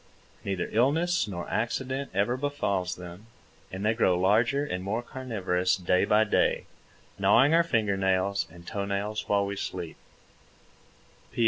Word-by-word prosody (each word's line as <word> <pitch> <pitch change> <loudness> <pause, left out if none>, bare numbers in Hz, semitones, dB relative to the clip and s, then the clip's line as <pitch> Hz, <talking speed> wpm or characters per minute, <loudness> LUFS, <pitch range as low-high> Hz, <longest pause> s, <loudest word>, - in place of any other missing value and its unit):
Neither 95 -3 -2
illness 160 +9 +2
nor 90 -4 -5
accident 130 +4 -2
ever 100 +6 +1
befalls 115 -10 -1
them, 90 +4 -11 0.4
and 95 +2 -4
they 110 - +3
grow 95 -6 +2
larger 115 +9 +2
and 90 -9 -4
more 110 +5 -2
carnivorous 100 -9 -1
day 90 0 +2
by 105 +1 +4
day, 105 - +1 0.5
gnawing 145 +4 +5
our 170 - +6
finger 110 -11 0
nails 95 +1 +1
and 85 +1 -14
toe 100 +2 -3
nails 105 +2 -3
while 100 -1 +2
we 100 0 -4
sleep. 90 -4 -5
100 Hz, 140 wpm, -27 LUFS, 95-120 Hz, 0.5 s, our